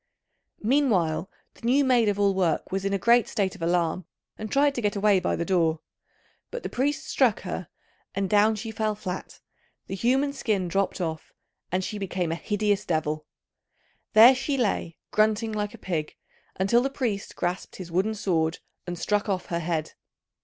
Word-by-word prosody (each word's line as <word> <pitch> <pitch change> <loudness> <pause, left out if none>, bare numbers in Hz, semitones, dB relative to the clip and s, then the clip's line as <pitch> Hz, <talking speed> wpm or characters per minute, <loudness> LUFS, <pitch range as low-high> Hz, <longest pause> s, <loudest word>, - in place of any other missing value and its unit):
Meanwhile 205 - +2 0.2
the - - -21
new 265 +4 +3
maid 245 -4 +4
of 205 0 -1
all 200 -1 +3
work 180 -5 0
was 195 +1 -2
in 195 - 0
a 200 - +1
great 235 +4 +4
state 190 -3 -1
of 190 - -13
alarm, 170 +1 0 0.3
and 215 0 -7
tried 280 +1 +3
to 245 - -3
get 205 -1 0
away 200 -1 +4
by 180 - 0
the 170 - -2
door; 165 -4 +1 0.7
but 485 - -6
the - - -3
priest 290 +4 -1
struck 245 -7 +2
her 180 -2 -5 0.5
and 195 0 0
down 210 +2 +4
she 220 +1 -5
fell 215 -1 -1
flat, 190 -3 -6 0.4
the - - -7
human 265 +7 +1
skin 210 -9 -1
dropped 195 +3 0
off, 160 -2 -4 0.4
and 185 +1 0
she 210 +2 -4
became 185 -3 -2
a - - 0
hideous 205 +2 0
devil. 155 -3 -2 0.9
There 225 +4 +9
she 270 +2 -2
lay 200 -8 -1
grunting 215 +1 +2
like 210 -1 -3
a - - -12
pig, 160 -5 -3 0.4
until 195 +6 +3
the 270 - 0
priest 235 -7 -3
grasped 175 +1 -3
his 180 -3 -8
wooden 195 +6 +1
sword 165 -5 0 0.3
and 175 0 -4
struck 205 +4 0
off 185 -2 -1
her 170 - +1
head. 160 -2 -2
200 Hz, 180 wpm, -26 LUFS, 180-225 Hz, 0.9 s, There